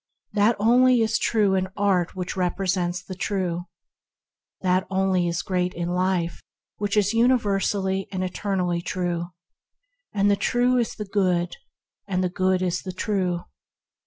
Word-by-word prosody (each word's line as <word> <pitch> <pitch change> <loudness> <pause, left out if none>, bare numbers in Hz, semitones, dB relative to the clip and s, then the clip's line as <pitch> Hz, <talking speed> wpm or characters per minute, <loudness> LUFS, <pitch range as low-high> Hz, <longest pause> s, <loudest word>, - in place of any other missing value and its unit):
That 210 +2 +3
only 245 +3 +5
is 225 +1 +1
true 210 -4 +2
in 190 0 +1
art 190 -4 +1
which 180 -1 -4
represents 180 -1 -1
the 185 - -7
True; 180 -2 -2 1.0
that 185 0 +1
only 190 -2 +1
is 170 0 -2
great 180 -1 -1
in 175 0 -2
life 180 -1 0 0.4
which 205 0 -1
is 205 +1 +3
universally 200 -5 +1
and 185 -1 -2
eternally 180 -2 -1
true. 175 -1 -2 0.9
The 200 0 +3
True 245 +4 +2
is 235 -2 0
the 210 - -5
Good; 180 -3 0 0.5
and 185 -2 0
the 180 - +1
Good 185 +1 +1
is 180 0 -1
the 185 - -6
True. 185 -3 -1
190 Hz, 140 wpm, -24 LUFS, 180-205 Hz, 1.0 s, only